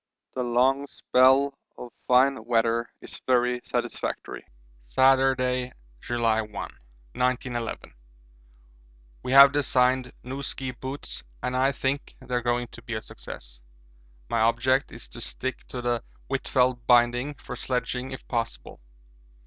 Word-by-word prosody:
The 130 - -2
long 130 +3 +2
spell 135 +2 +3 0.2
of 120 - -9 0.2
fine 130 -1 +4
weather 115 0 +1
is - - -9
very 125 -1 +2
satisfactory. - - -3 0.4
Saturday, 130 - +2 0.3
July 115 -2 +1
1, 105 - -8
1911. 115 - -4 1.3
We 125 - -2
have 140 0 +10
designed 130 -3 +2
new 130 +3 -5
ski 130 -1 -3
boots 130 +3 -6 0.2
and 125 - -1
I 130 +2 +3
think 140 +1 -2
they 130 -2 -8
are 120 - +2
going 120 0 0
to 120 - -12
be 120 -1 -5
a 110 - -3
success. - - -10 0.7
My 115 - 0
object 120 +4 +2
is 120 - -8
to 120 - -9
stick 130 +3 -4
to 125 -1 -6
the 120 -1 0 0.3
Huitfeldt 130 -2 +1
binding 120 +3 +4
for - - -8
sledging 125 0 -2
if 130 - -9
possible. 115 -1 -4
125 Hz, 130 wpm, -26 LUFS, 120-130 Hz, 1.3 s, have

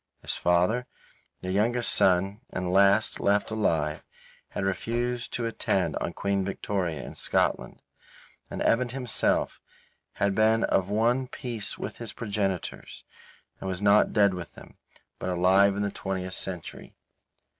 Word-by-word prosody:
His - - -1
father, 90 +9 +2 0.5
the 95 - -3
youngest 115 +5 +2
son 95 +3 +3
and 90 - -4
the - - -2
last 100 +3 +4
left 100 +2 +1
alive, 80 -8 0 0.5
had 95 - -3
refused 120 +5 -2
to 120 - -1
attend 115 - 0
on - - -2
Queen 100 -1 -1
Victoria 95 -4 -2
in - - -8
Scotland. - - -1 0.7
And - - -3
Evan 125 +1 +2
himself 125 -2 0 0.5
had 100 -1 +1
been 110 +2 +3
of 95 0 +1
one 120 +5 +1
piece 120 -5 -5
with - - -6
his - - -6
progenitors; 100 -4 -3 0.6
and 95 - -4
was 90 -1 -3
not 105 +1 +4
dead 100 -3 +4
with 85 -6 -7
them, - - -15 0.4
but - - -3
alive 95 +3 +4
in 100 - -1
the 100 - -1
twentieth 95 -1 -4
century. 90 -3 -6
100 Hz, 145 wpm, -27 LUFS, 95-110 Hz, 0.7 s, last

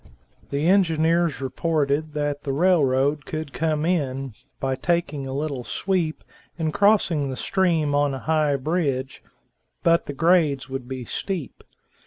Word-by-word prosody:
The 145 +3 0
engineers 165 -5 +2
reported 150 +1 -1
that 145 -1 -2
the 140 - -3
railroad 145 -3 +2
could 155 -3 -5
come 155 -1 0
in, 135 -7 -1 0.3
by 135 0 -1
taking 150 -2 -1
a - - -5
little 140 -2 -3
sweep 175 0 -1 0.3
and 160 -2 -1
crossing 185 -9 +3
the 130 - -4
stream 170 -6 +1
on 145 -1 +2
a 130 - -9
high 155 -2 +2
bridge, 140 -3 -2 0.6
but 170 0 +3
the 145 - -4
grades 155 -3 +2
would 130 -2 -6
be 130 -1 -5
steep. 180 -3 -5
150 Hz, 140 wpm, -24 LUFS, 135-170 Hz, 0.6 s, crossing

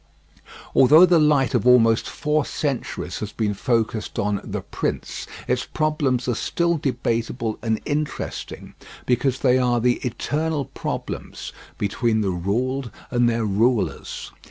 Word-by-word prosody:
Although 150 +7 +8
the 175 -2 +4
light 145 -4 +3
of 125 -1 +1
almost 115 -2 +5
four 150 -1 0
centuries 140 -4 -3
has 105 -1 -5
been 105 -2 -1
focused 115 0 -1
on 100 0 0
The - - -4
Prince, - - -4 0.2
its 125 -1 +1
problems 145 -5 0
are 125 - +2
still 170 +7 0
debatable 115 -3 -2
and 110 -2 0
interesting, 150 0 -4 0.3
because 130 +1 +1
they 130 -1 +4
are 125 -1 +2
the 120 +1 +2
eternal 145 +4 -2
problems - - -5 0.2
between 110 +2 0
the 100 -2 0
ruled 120 +9 -1 0.2
and 120 -1 +3
their 115 -1 0
rulers. 110 +3 0
125 Hz, 130 wpm, -23 LUFS, 115-140 Hz, 0.3 s, Although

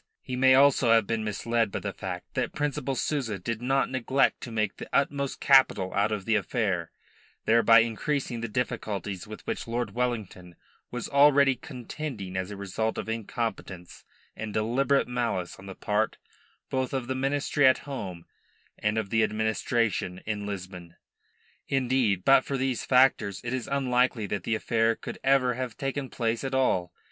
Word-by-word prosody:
He 125 - -4
may 130 +1 +5
also 135 -3 +5
have 115 -2 +4
been 110 +1 -1
misled 110 +1 0
by - - -3
the 100 -1 -4
fact 90 -3 -7
that - - -2
Principal 140 -2 -1
Souza 125 -6 -1
did 115 +5 -4
not 135 +2 +1
neglect 130 +1 +1
to 120 - -7
make 110 -2 -1
the - - -8
utmost 140 -1 0
capital 130 -9 +4
out 100 +2 +1
of 105 -3 -3
the 115 - +1
affair, 100 -5 0 0.5
thereby 115 0 +6
increasing 120 +2 -2
the 115 - -2
difficulties 105 -5 -3
with 110 0 -10
which - - -4
Lord 120 +1 -2
Wellington 110 -8 -3 0.3
was 125 -1 -5
already 140 -1 +5
contending 120 -5 -7
as 95 +1 -2
a 105 - -7
result 100 +3 -2
of - - -4
incompetence 110 -5 -5 0.3
and 110 -1 -5
deliberate 125 +6 +1
malice 115 -8 -2
on 95 - -12
the 95 - -8
part 105 +1 -1 0.5
both 130 +1 -1
of 130 -2 -2
the 130 - -2
ministry 140 +1 +2
at 130 - +3
home 95 - -6 0.5
and 105 +1 0
of 110 -3 -2
the 110 -1 +3
administration 110 -3 0
in 105 -1 -3
Lisbon. 90 -3 -7 0.7
Indeed, 125 -8 +1
but 135 - +6
for 140 - -3
these 130 -2 -1
factors 125 -7 +3
it 120 +1 -3
is 130 -3 -3
unlikely 125 -4 +1
that 100 -2 -4
the 115 - +1
affair 115 +1 +1
could - - -8
ever 135 -2 +3
have 125 -2 -5
taken 135 -1 -3
place 115 0 -1
at 135 0 -2
all. 95 -9 +1
115 Hz, 170 wpm, -27 LUFS, 105-130 Hz, 0.7 s, thereby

